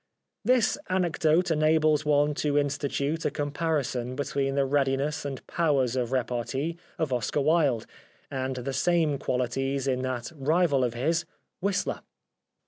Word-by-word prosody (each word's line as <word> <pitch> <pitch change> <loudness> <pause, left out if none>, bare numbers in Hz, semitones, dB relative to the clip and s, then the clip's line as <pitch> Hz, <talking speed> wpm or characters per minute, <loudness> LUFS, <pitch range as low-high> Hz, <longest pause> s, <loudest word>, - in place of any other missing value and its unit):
This 250 +1 +3
anecdote 175 -2 +2
enables 155 -1 +3
one 145 0 +3
to 145 0 0
institute 145 +2 -1
a - - +2
com 145 -1 -3
parison 140 -6 -1
between 140 -1 -1
the 140 -1 +2
readiness 140 +1 0
and 135 -2 -5
powers 140 -7 +1
of 125 -2 -1
repartee 130 +5 -1 0.2
of 155 -5 -1
Oscar 125 +4 0
Wilde 145 -6 +2 0.5
and 130 -1 -2
the 130 +2 -4
same 155 0 +2
qualities 135 +2 -1
in 130 -2 0
that 130 +1 -3
rival 150 -1 +2
of 120 -1 -1
his, 160 +7 0 0.3
Whistler. 195 0 -1
140 Hz, 135 wpm, -27 LUFS, 130-155 Hz, 0.5 s, This